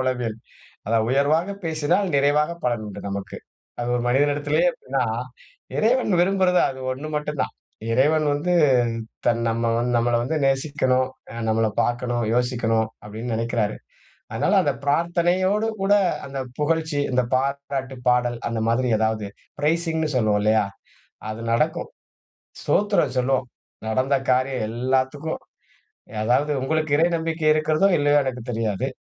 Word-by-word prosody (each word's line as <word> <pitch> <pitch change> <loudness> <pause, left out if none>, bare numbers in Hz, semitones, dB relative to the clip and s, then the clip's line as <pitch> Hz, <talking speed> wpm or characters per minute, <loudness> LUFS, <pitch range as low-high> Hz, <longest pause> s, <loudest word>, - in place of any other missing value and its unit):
உளவியல் 125 -4 -1 0.5
அதாவது 110 0 +2
"உயர்வாக 155 +8 +2
பேசினால் 160 +5 +1
நிறைவாக 145 +3 +3
பலன் 120 -3 0
உண்டு" 100 -1 -8
நமக்கு. 100 0 -5 0.4
அது 120 - -2
1 120 - -1
மனிதனிடத்திலேயே 145 - +2
அப்டினா 475 -1 -2 0.7
இறைவன் 235 0 +2
விரும்புறது 185 -1 +3
அது 130 - -9
1 140 +4 -6
மட்டும் 150 -1 -3
தான். - - -4 0.4
இறைவன் 150 +5 +3
வந்து 150 +5 -1 0.7
தன் 115 -1 +2
நம்ம 115 +1 0 0.3
நம்மல 120 0 +2
வந்து 140 +6 -2
நேசிக்கனும். 135 -2 +1 0.2
ஆ - - -9
நம்மல 110 0 +2
பார்க்கனும், 120 0 -1
யோசிக்கனும் 120 -2 +1 0.2
அப்டினு 110 +3 -6
நெனைக்கிறாரு. 115 -2 -1 0.6
அதனால - - +1
அந்த 145 - +2
பிரார்த்தனையோடு 175 +7 +1 0.2
கூட 195 +1 +3 0.3
அந்த 135 0 -7 0.2
புகழ்ச்சி, 160 0 0
அந்த 125 0 +2
பாராட்டு 135 0 -2
பாடல் 125 -1 +2
அந்த 115 -1 -2
மாதிரி 120 +3 +1
ஏதாவது 110 -1 0 0.3
பிரைசிங்னு 160 +1 0
சொல்வோம் 110 -4 +2
இல்லையா? 110 0 +3 0.6
அது 110 +1 -5
நடக்கும். 155 +8 0 0.7
"ஸ்தோத்திரம்" 200 -10 +1
சொல்லுவோம். 125 0 +1 0.4
நடந்த 130 +5 +1 0.2
காரியம் 130 -1 +1
எல்லாத்துக்கும். 130 +6 -1 0.8
அதாவது 125 +6 +2
உங்களுக்கு 155 +2 -1
இறை 165 +2 +4
நம்பிக்கை 160 -1 -3
இருக்கிறதோ! 155 +4 +2
இல்லையோ! 145 0 +3
எனக்குத் 125 -2 -5
தெரியாது. 115 +1 -1
135 Hz, 125 wpm, -23 LUFS, 120-155 Hz, 0.8 s, இறை